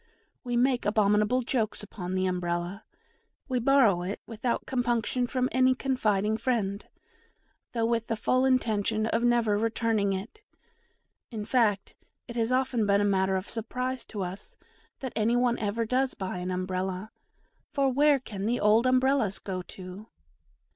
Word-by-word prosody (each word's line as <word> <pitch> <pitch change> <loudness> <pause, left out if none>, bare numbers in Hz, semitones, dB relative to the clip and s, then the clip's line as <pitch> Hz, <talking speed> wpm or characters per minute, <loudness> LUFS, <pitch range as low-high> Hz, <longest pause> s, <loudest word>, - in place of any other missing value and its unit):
We 245 -1 -1
make 250 0 +2
abominable 210 +3 +2
jokes 225 -4 -1
upon 185 -3 -5
the 185 0 +1
Umbrella; 180 +2 -2 0.6
we 255 -1 0
borrow 240 -8 +4
it 190 +4 -4
without 230 +2 -2
compunction 245 -1 0
from 255 0 0
any 255 0 +4
confiding 220 -6 0
friend, 220 -4 -1 0.9
though 230 -2 +1
with 230 -1 0
the 225 - -1
full 255 +4 +1
intention 220 -4 +1
of 230 +1 0
never 235 -4 +3
returning 225 -2 +1
it 210 - -6 0.9
in 215 -3 -5
fact, 215 -5 +1 0.3
it 235 - -8
has 230 0 0
often 255 -4 +1
been 200 0 +4
a - - +2
matter 190 -1 +2
of 190 0 -3
surprise 250 +3 -3
to 205 -3 -5
us 185 +3 -7 0.4
that 260 -2 -5
any 225 +2 +2
one 245 -1 +2
ever 220 +2 -1
does 255 +3 0
buy 190 -1 -4
an 180 +1 -4
Umbrella, 185 +2 -3 0.6
for 275 -2 +1
where 290 +1 +4
can 205 -5 -5
the 240 +2 +1
old 220 +4 +4
Umbrellas 255 -5 +2
go 185 -2 -4
to? 185 +3 -10
225 Hz, 155 wpm, -28 LUFS, 200-250 Hz, 0.9 s, borrow